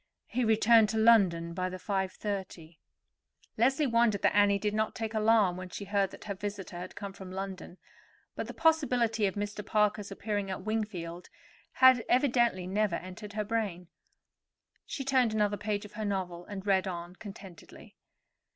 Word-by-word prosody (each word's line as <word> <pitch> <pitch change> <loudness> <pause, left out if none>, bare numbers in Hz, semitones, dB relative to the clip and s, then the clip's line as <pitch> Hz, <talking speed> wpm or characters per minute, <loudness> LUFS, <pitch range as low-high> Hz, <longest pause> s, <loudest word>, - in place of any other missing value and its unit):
He 250 +1 -2
returned 220 0 +5
to 220 - -2
London 190 -7 +4
by 185 +1 -2
the 185 - -6
5.30." 190 -4 -4 0.8
Leslie 265 +6 +2
wondered 230 -5 +2
that - - +3
Annie 205 -1 +5
did 210 +1 -2
not 215 0 -1
take 225 0 -4
alarm 215 -4 +3
when 185 0 -7
she 200 - -7
heard 200 -1 +1
that - - -12
her 205 - -4
visitor 195 -2 -6
had 180 +1 -8
come 200 -1 -6
from 190 -1 -10
London; 190 -1 -6 0.6
but - - -4
the - - -7
possibility 250 -9 +2
of 190 - -4
Mr. 205 0 -4
Parker's 210 0 +1
appearing 205 0 -3
at 190 -1 -5
Wingfield 185 -6 -4 0.4
had 260 -2 +6
evidently 240 -7 +2
never 200 0 0
entered 200 +4 -8
her 210 0 -2
brain. 200 -6 -3 1.0
She 275 -4 -5
turned 255 -5 +2
another 210 -1 +2
page 205 0 -3
of 210 - -13
her 215 - -5
novel, 185 -4 -3
and 200 -1 -7
read 190 -1 +2
on 175 0 -6
contentedly. 195 -5 -12
205 Hz, 165 wpm, -30 LUFS, 185-220 Hz, 1.0 s, had